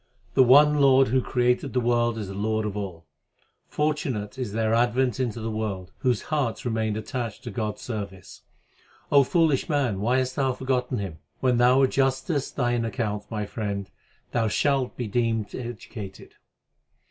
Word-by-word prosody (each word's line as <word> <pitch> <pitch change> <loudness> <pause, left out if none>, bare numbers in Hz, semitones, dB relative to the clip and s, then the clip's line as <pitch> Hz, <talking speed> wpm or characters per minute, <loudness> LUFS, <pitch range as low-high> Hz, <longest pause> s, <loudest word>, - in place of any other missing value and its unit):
The 135 - +5
one 145 +4 +6
Lord 135 -2 +5
who 130 +2 +2
created 125 0 0
the 130 - +2
world 120 -1 +1
is 105 -3 -4
the 95 - -6
Lord 110 +2 -1
of 105 -1 -3
all. 95 -5 -6 0.6
Fortunate 135 -9 -2
is 125 -5 -3
their 110 +1 0
advent 120 +1 +2
into 120 -3 -1
the 115 0 -3
world, 100 -4 -4
whose 125 -4 +1
hearts 130 -7 -1
remain 110 -2 0
attached 110 0 -4
to 120 - -6
God 105 0 -2
s - - -13
service. 100 -5 -7 0.7
O 140 -1 +7
foolish 160 +1 +2
man, 135 -10 +1
why 120 +5 +2
hast 130 0 -1
thou 135 -2 +2
forgotten 125 -1 -1
Him? 95 -7 -5 0.2
When 125 -2 +2
thou 125 +3 +5
adjustest 135 +2 0
thine 120 -2 +1
account, 105 -2 -3
my 105 -2 -3
friend, 100 -2 -4 0.4
thou 115 -2 +1
shalt 135 +2 0
be 125 - -2
deemed 115 -1 -1
educated. 115 -4 -8
120 Hz, 165 wpm, -25 LUFS, 105-130 Hz, 0.7 s, O